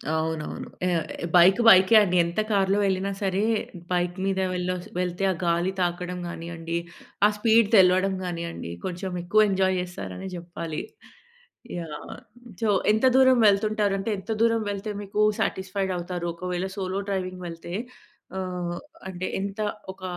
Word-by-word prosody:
అవునవును. 160 -1 -3 0.2
ఆహ్, 170 -3 0 0.3
బైక్, 185 +5 +7
బైకే 190 +2 +8
అండి. 180 -3 0
ఎంత 170 +4 -3
కార్‌లో 195 -1 +2
వెళ్ళినా 195 0 0
సరే, 195 0 0 0.5
బైక్ 175 0 0
మీద 195 -1 0
వెళ్ళొస్ 180 0 -3
వెళ్తే 180 +1 -2
ఆ - - 0
గాలి 170 +2 +1
తాకడం 180 +1 -2
గానియండి, 165 0 -5 0.5
ఆ - - +8
స్పీడ్ 225 0 +4
తెలవడం 185 0 +5
గానియండి, 170 - -5
కొంచెం 185 +1 -4
ఎక్కువ 215 +5 +4
ఎంజాయ్ 190 -1 +2
చేస్తారనే 135 - -6
చెప్పాలి. 170 -2 -5 1.0
యాహ్! 155 -3 -7 0.5
సో, 220 - +2 0.2
ఎంత 220 +4 +2
దూరం 260 -1 +6
వెళ్తుంటారంటే 205 0 +1
ఎంత 220 - -7
దూరం 230 -1 +3
వెళ్తే 200 +2 -4
మీకు 205 +1 -4 0.2
సాటిస్ఫైడ్ 190 0 -1
అవుతారు? 175 0 -4
ఒకవేళ 180 +1 -3
సోలో 190 0 -2
డ్రైవింగ్ 185 -1 -3
వెళ్తే, 165 +1 -8 0.7
ఆహ్, 180 -2 -3 0.3
అంటే 185 0 -4
ఎంత 200 +2 -5 0.3
ఒక 190 - -18
185 Hz, 135 wpm, -25 LUFS, 175-195 Hz, 1.0 s, బైకే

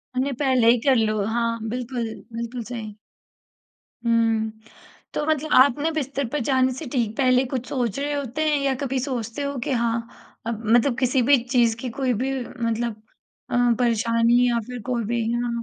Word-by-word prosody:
हमने 265 +2 0
पहले 260 -5 +3
ही 245 - +3
कर 270 -2 +5
लो। 215 -2 +1
हाँ 230 +1 -1
बिल्कुल, 245 0 -3 0.3
बिल्कुल 235 +1 -4
सही। 220 -3 -7 1.1
हुँ, 225 -1 +2 0.6
तो 295 - -1
मतलब 310 0 0
आप 260 +1 +6
ना 315 +3 +1
बिस्तर 280 -4 -2
पर 295 - +1
जाने 260 -1 +3
से 295 +4 -7
ठीक 230 -4 0
पहले 255 -1 +3
कुछ 255 -1 -3
सोच 245 -5 -1
रहे 290 +1 -1
होते 285 +1 -2
हैं 295 - +2
या 275 -1 +1
कभी 265 -1 -1
सोचते 245 -1 -3
हो 280 0 -3
कि - - -2
हाँ 235 -2 +1 0.5
मतलब 230 +3 +2
किसी-भी 260 +1 +4
चीज़ 240 -3 +2
की 250 +1 -5
कोई-भी 260 0 0
मतलब 230 -2 -3 0.5
अ, 245 - -1 0.2
परेशानी 235 +1 +3
या 235 -1 +1
फ़िर 250 -2 -6
कोई 245 -1 -2
भी 235 +1 -1
या 240 0 -1
245 Hz, 170 wpm, -23 LUFS, 230-265 Hz, 1.1 s, आप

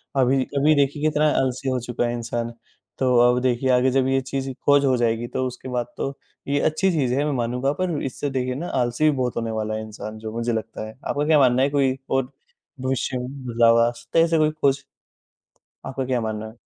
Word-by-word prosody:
अभी 130 0 +3
अभी 150 +2 +4
देखिए 145 +1 +1
कितना 155 0 +2 0.2
आलसी 130 +1 -1
हो 130 -1 0
चुका 120 0 -2
है 120 - -2
इंसान। 120 0 -3 0.5
तो 130 -1 +2
अब 125 0 +2
देखिए, 130 +1 +1
आगे 125 +1 +4
जब 130 0 +2
ये 135 0 +2
चीज़ 135 +1 -4 0.2
खोज 145 0 +5
हो 130 -1 +3
जाएगी, 115 0 0
तो 130 - -2
उसके 130 +1 -8
बाद 125 -1 -1
तो 135 0 -3 0.3
ये 140 +1 +1
अच्छी 155 +6 +1
चीज़ 135 -7 0
है, 140 +3 +1
मैं 150 - 0
मानूँगा, 125 +2 0
पर 175 -3 -2
इससे 140 +2 -3
देखिए 130 -1 -2
ना 170 +6 -4
आलसी 120 +4 -1
भी 150 - 0
बहुत 125 -1 -1
होने 115 -1 -2
वाला 110 0 -2
है 110 - -3
इंसान, 110 0 -8
जो 110 0 -6
मुझे 115 0 -1
लगता 110 -1 -4
है। 110 - -10
आपका 145 +1 0
क्या 155 -1 +5
मानना 130 -2 +4
है, 135 - +3
कोई 135 -2 +1
और 135 0 0 0.5
भविष्य 130 0 -1
में 125 - -4 0.2
बदलाव 115 -1 +4
आ - - +2
सकता 120 +7 -2
है, 165 - +6
ऐसा 165 -1 +1
कोई 155 -1 +3
खोज? 140 -2 0 1.0
आपका 130 0 -3
क्या 125 -2 0
मानना 110 -1 -3
है? 110 +2 -14
130 Hz, 225 wpm, -23 LUFS, 120-140 Hz, 1.0 s, है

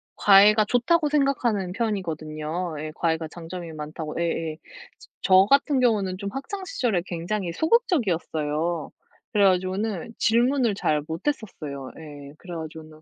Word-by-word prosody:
과외가 210 +2 +6
좋다고 295 +7 +2
생각하는 245 -10 +1
편이거든요. 165 -6 -3
예 155 0 -5
과외가 160 -1 0
장점이 170 +1 -8
많다고 155 +1 -6
예예. 165 -2 -2 0.6
저 190 0 +6
같은 280 -1 +4
경우는 205 -7 +1
좀 200 +1 -4
학창 375 +8 -5
시절에 235 - 0
굉장히 175 +1 -3
소극적이었어요. 170 - 0 0.4
그래 205 -1 +4
가지고는 190 +3 0
질문을 240 0 +2
잘 150 -6 +1
못했었어요. 160 - -4
예. 145 -3 -10
그래 175 -2 -8
가지고는 155 -1 -9
185 Hz, 325 characters per minute, -25 LUFS, 160-230 Hz, 0.6 s, 과외가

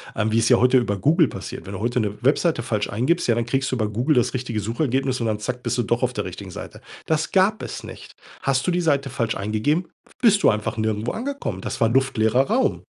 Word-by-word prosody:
ähm, 110 0 0
wie 115 - +3
es 115 - +2
ja 125 - +6
heute 125 +1 +4
über 100 -5 0
Google 155 - +3
passiert. 95 - -7
Wenn 100 - -7
du 95 - -5
heute 120 +2 0
'ne 105 +1 -3
Webseite 145 -1 +2
falsch 105 -3 -1
eingibst, 130 - 0
ja, 115 - +3
dann 120 -1 -1
kriegst 135 +3 0
du - - 0
über 110 -3 -1
Google 125 +9 +1
das 125 - +2
richtige 120 -4 -3
Suchergebnis 130 - -1
und 115 - -1
dann 105 -1 -1
zack, 125 +3 -4
bist - - -1
du 120 - +1
doch - - 0
auf - - 0
der - - -2
richtigen - - -8
Seite. - - -9 0.3
Das 160 0 0
gab 195 +3 +2
es - - -6
nicht. - - -11 0.3
Hast 135 +2 +1
du - - +3
die 175 0 +1
Seite 140 -4 +1
falsch 115 -1 -1
eingegeben, 110 - 0 0.3
bist 210 -4 +4
du - - +7
einfach 105 +1 -3
nirgendwo 110 +1 -1
angekommen. 245 - -4
Das - - -5
war 115 - +4
luftleerer 125 -2 +2
Raum. 260 +3 +1
125 Hz, 245 wpm, -23 LUFS, 110-145 Hz, 0.3 s, du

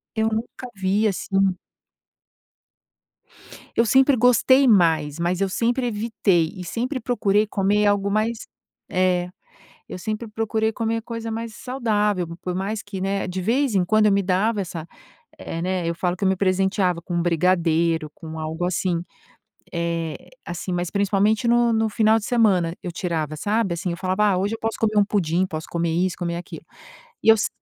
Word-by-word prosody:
eu 220 0 +1
nunca 230 +3 -5
vi, 195 +3 +1
assim 195 -1 0 2.2
Eu 230 - +3
sempre 265 +4 +5
gostei 250 +3 +4
mais, 165 - +3
mas 175 +2 0
eu 195 - +1
sempre 240 +5 0
evitei 205 -7 +1
e 185 - -7
sempre 250 - -3
procurei 210 -4 +1
comer 205 +1 +1
algo 205 -1 +2
mais 215 +2 -1 0.4
é, 180 -1 +1 0.6
eu - - -6
sempre 215 +4 -4
procurei 220 0 -1
comer 225 +1 -1
coisa 230 -1 -5
mais 225 0 -5
saudável, 210 -7 -1 0.2
por 180 - -3
mais 205 +3 -3
que, 200 -3 -7
né, 195 0 -1
de 185 +1 -3
vez 235 +5 +1
em 185 - +3
quando 215 +3 +3
eu 210 - +4
me 200 - +3
dava 200 +3 +1
essa 170 -4 -5 0.5
eh, 165 - -5
né, 180 -1 -1
eu 170 - -1
falo 180 +1 -1
que 200 - -3
eu - - +4
me 190 - +3
presenteava 185 -1 +1
com 175 -1 -2
brigadeiro, 165 -2 +1
com 160 0 -9
algo 160 +2 -3
assim. 175 -1 0 0.7
Eh, 170 -2 -3 0.2
assim, 175 +2 -5
mas 175 -1 -2
principalmente 205 +2 +1
no 240 0 +4
no 225 0 +1
final 220 0 +3
de 215 - -7
semana 195 -9 +2
eu 180 - -4
tirava, 160 -4 -3
sabe, 205 +2 0
assim, 175 +2 -3
eu 170 - -3
falava: 185 +3 0
"Ah, 180 - +1
hoje 200 +4 -1
eu - - -6
posso 225 0 -2
comer 215 -1 +1
um 205 - +5
pudim, 185 -3 0
posso 160 -3 -6
comer 170 -1 -1
isso, 180 +3 0
comer 170 -1 -2
aquilo". 175 - -8 0.6
E - - -3
eu 220 - +9
se - - 0
195 Hz, 175 wpm, -23 LUFS, 175-220 Hz, 2.2 s, eu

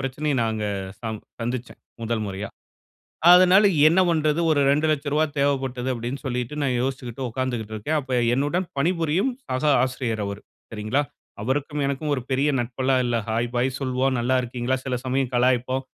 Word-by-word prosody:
பிரச்சனைய 135 +2 -2
நாங்க 110 -1 -1 0.4
ச - - -53 0.4
சந்திச்சேன், 120 +1 -4 0.2
முதல் 115 -1 -1
முறையா. 100 +1 -5 0.8
அதனால 185 +3 +7 0.2
என்ன 170 +4 +4
பன்றது 155 -1 +1
ஒரு 145 -2 +3
ரூ.2,00,000 150 0 +1
தேவப்பட்டது 135 -2 0
அப்டின்னு 120 +3 -5
சொல்லிட்டு 125 0 -3
நான் 130 -3 +1
யோசிச்சுக்கிட்டு 130 -1 -4
உட்காந்துகிட்டு 120 -3 -3
இருக்கேன். 150 +9 -1
அப்ப 135 -2 -8 0.2
என்னுடன் 145 +7 0
பணிபுரியும் 165 - +1 0.2
சக 130 +3 -2 0.2
ஆசிரியர் 125 -4 -2
அவரு. 100 +1 -5 0.3
சரிங்களா, 110 +5 0 0.4
அவருக்கும் 145 +5 -1
எனக்கும் 145 +2 -2
ஒரு 130 - -3
பெரிய 135 +3 +2
நட்பெலாம் 130 +2 0
இல்ல. 120 -1 0
ஹாய், 115 +2 0
பாய் 125 +1 0
சொல்வோம். 130 0 0
நல்லா 130 +2 +2
இருக்கீங்களா? 125 +1 -2
சில 130 - -1
சமயம் 130 0 0
கலாய்ப்போம், 130 +1 +1
130 Hz, 145 wpm, -24 LUFS, 120-145 Hz, 0.8 s, அதனால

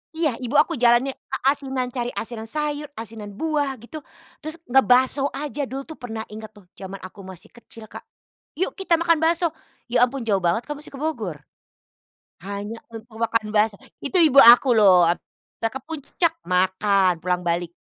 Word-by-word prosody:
Iya, 310 -7 0
ibu 250 +2 -4
aku 300 0 +3
jalannya 240 +2 +4 0.2
a - - -3
asinan, 265 -3 -3
cari 245 -1 -3
asinan 225 0 -5
sayur, 300 +2 -3
asinan 220 -2 -8
buah, 290 0 -1
gitu. 310 +6 -8 0.4
Terus 310 +1 -5 0.2
ngebakso 260 +1 +4
aja 290 0 -4
dulu 270 +1 -5
tuh 315 +2 -11
pernah 225 -3 -5
ingat 220 0 -9
tuh, 205 -3 -17
jaman 195 0 -7
aku 185 +2 -11
masih 190 -3 -11
kecil, 230 -1 -15
Kak, - - -9 0.5
"Yuk, 370 +4 -1
kita 365 -3 +2
makan 335 -1 +2
bakso!" 330 +1 +1 0.4
Ya 245 0 +4
ampun 265 0 -6
jauh 200 -3 +2
banget, 175 +7 +1
Kak, 295 - -4
musti 300 - -12
ke 275 - -8
Bogor. 220 - -4 1.0
Hanya 200 +3 -6
untuk 225 0 -11
makan 230 -1 0
bakso, 210 -1 +2 0.3
itu 285 +6 0
ibu 295 -4 +5
aku 245 +2 +8
loh 185 -5 +6
ap 170 - +1 0.4
kita 225 - -1
ke 265 - -6
Puncak, 320 +2 -1
makan, 185 +1 +2
pulang 180 0 0
balik. 170 0 -1
240 Hz, 175 wpm, -23 LUFS, 210-290 Hz, 1.0 s, aku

